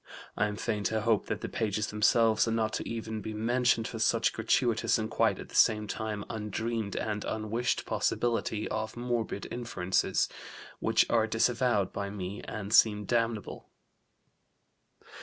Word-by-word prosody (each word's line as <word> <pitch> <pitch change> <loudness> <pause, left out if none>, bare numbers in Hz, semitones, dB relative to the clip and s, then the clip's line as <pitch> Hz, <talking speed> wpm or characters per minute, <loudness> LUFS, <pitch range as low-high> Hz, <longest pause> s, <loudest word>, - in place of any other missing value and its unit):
I 105 - +2
am 105 - -4
fain 105 -1 -2
to 110 +3 0
hope 110 -1 +1
that 105 0 -3
the - - -3
pages 105 -2 -1
themselves 110 +1 +3
are - - 0
not 110 -1 0
to - - -2
be - - -7
even 110 -1 -4
mentioned 115 +2 +1
for 115 - -6
such 115 +1 +2
gratuitous 115 +1 +2
and 110 -1 -3
quite - - +2
at - - -9
the 105 -1 +4
time 105 -1 -4
undreamed 110 -1 -3
and 105 -1 -2
unwished 110 +3 -1
possibility 115 -2 0
of 110 +1 -3
morbid 120 -4 -2
inferences 95 -7 0 0.5
which - - +3
are 110 -1 +2
disavowed 115 -2 +1
by 100 0 -3
me 100 0 -5
and 105 0 -5
seem 105 -2 +5
damnable." 115 -2 -2
110 Hz, 150 wpm, -30 LUFS, 105-115 Hz, 0.5 s, seem